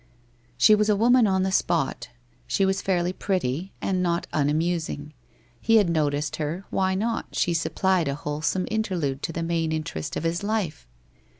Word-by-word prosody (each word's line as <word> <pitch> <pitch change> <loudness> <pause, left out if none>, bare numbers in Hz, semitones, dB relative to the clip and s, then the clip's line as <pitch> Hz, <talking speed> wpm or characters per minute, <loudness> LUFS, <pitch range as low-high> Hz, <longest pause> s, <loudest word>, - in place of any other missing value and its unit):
She 130 +12 +6
was 210 0 +3
a 210 - +4
woman 235 +2 +4
on 190 -1 +2
the 190 - 0
spot. 165 -9 0 0.4
She 195 - +2
was 190 +1 0
fairly 180 -1 0
pretty, 185 -3 -2
and 185 -1 0
not 170 -1 0
unamusing. 155 0 -1 0.5
He 225 - +3
had 205 -6 +4
noticed 150 -2 0
her, 160 +5 -3
why 190 0 +1
not, 225 +4 -2
she 175 - +1
supplied 180 +1 +1
a 140 - -1
wholesome 150 +5 -2
interlude 175 -11 -1
to - - -3
the 165 +1 -3
main 165 -1 0
interest 155 - -4
of - - -3
his 170 +2 -1
life 200 - -2
175 Hz, 170 wpm, -25 LUFS, 155-195 Hz, 0.5 s, She